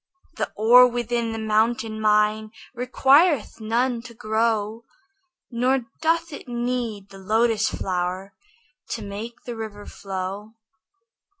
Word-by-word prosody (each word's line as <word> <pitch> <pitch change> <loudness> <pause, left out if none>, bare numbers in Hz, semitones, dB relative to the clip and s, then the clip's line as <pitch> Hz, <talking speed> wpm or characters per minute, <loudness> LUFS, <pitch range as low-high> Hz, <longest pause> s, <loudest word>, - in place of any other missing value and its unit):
The - - -2
ore 245 +4 +7
within 240 -1 -2
the 225 - -4
mountain 220 +1 0
mine 215 0 +2 0.2
Requireth 265 - +3
none 235 +2 0
to 235 -1 -12
grow; 220 0 -1 0.7
Nor 255 +3 +1 0.2
doth 330 0 +1
it 285 - -9
need 240 -4 -3
the 195 - -12
lotus 220 +2 +2
flower 185 +1 -3 0.6
To 225 - -5
make 210 +4 -7
the 240 - -6
river 215 -2 -7
flow. 195 +3 -6
225 Hz, 115 wpm, -23 LUFS, 210-240 Hz, 0.7 s, ore